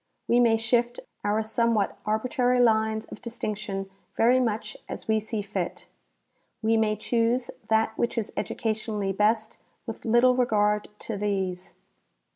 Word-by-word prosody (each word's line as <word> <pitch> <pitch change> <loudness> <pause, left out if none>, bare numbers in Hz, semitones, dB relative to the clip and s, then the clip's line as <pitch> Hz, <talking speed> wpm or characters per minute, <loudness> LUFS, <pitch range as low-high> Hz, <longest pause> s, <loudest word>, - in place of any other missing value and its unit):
We 240 - +4
may 230 -2 +5
shift 240 +2 +1 0.2
our 210 +2 +1
somewhat 225 -1 +1
arbitrary 245 +3 +1
lines 220 -2 +3
of - - -11
distinc 230 -3 -4
tion 195 -2 -4 0.3
very 245 +3 +5
much 215 -3 -1
as - - -6
we 220 0 +3
see 215 0 -4
fit. 200 - -4 0.7
We 225 +1 +3
may 220 -1 +2
choose 235 +3 0 0.2
that 220 0 +2
which 235 - 0
is 225 -2 -2
educationally 215 -3 -2
best 215 +2 +1 0.3
with 225 -2 -7
little 240 +2 +4
regard 210 -4 +2
to 220 - -4
these. 190 -3 -2
220 Hz, 140 wpm, -26 LUFS, 210-235 Hz, 0.7 s, may